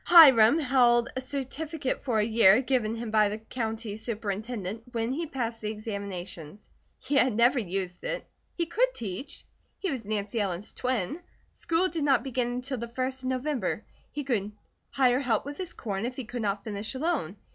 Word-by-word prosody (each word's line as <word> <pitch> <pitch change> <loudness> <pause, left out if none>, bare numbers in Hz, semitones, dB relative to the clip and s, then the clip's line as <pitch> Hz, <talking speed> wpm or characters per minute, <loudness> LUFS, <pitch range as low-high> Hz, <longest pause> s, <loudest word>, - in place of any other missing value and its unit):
Hiram 275 -7 +9
held 250 -5 +4
a 260 - -2
certificate 280 +2 -3
for 245 -5 0
a 215 - +4
year, 220 -2 +6
given 240 -4 +1
him 230 -1 -5
by 215 -1 +4
the 210 - -3
County 220 -1 -4
Superintendent, 220 -1 -3
when 230 +2 0
he 325 +4 -2
passed 235 -5 -3
the 210 - -2
examinations. 200 -5 -6 0.3
He - - -5
had 255 -5 +4
never 240 +3 +4
used 185 -3 -4
it. - - -3 0.3
He 340 - 0
could - - +1
teach; 225 +6 -6 0.3
he 385 - -2
was 255 -4 -3
Nancy 210 +1 -2
Ellen's 195 0 -3
twin. 255 - -1 0.3
School 335 +3 +1
did 330 -4 -3
not 275 -4 +3
begin 255 -2 -1
until 250 +1 -3
the 235 - -4
first 260 +2 -3
of 255 - -2
November. 260 +1 -1 0.3
He 295 - -4
could 215 -6 -1 0.4
hire 255 -2 +3
help 245 -5 +1
with 285 0 -6
his 365 -2 -3
corn 205 0 -3
if 250 - -6
he 260 - -5
could 245 +1 -5
not 200 -1 -1
finish 215 +3 -4
alone. 265 - -1
240 Hz, 180 wpm, -28 LUFS, 215-270 Hz, 0.4 s, Hiram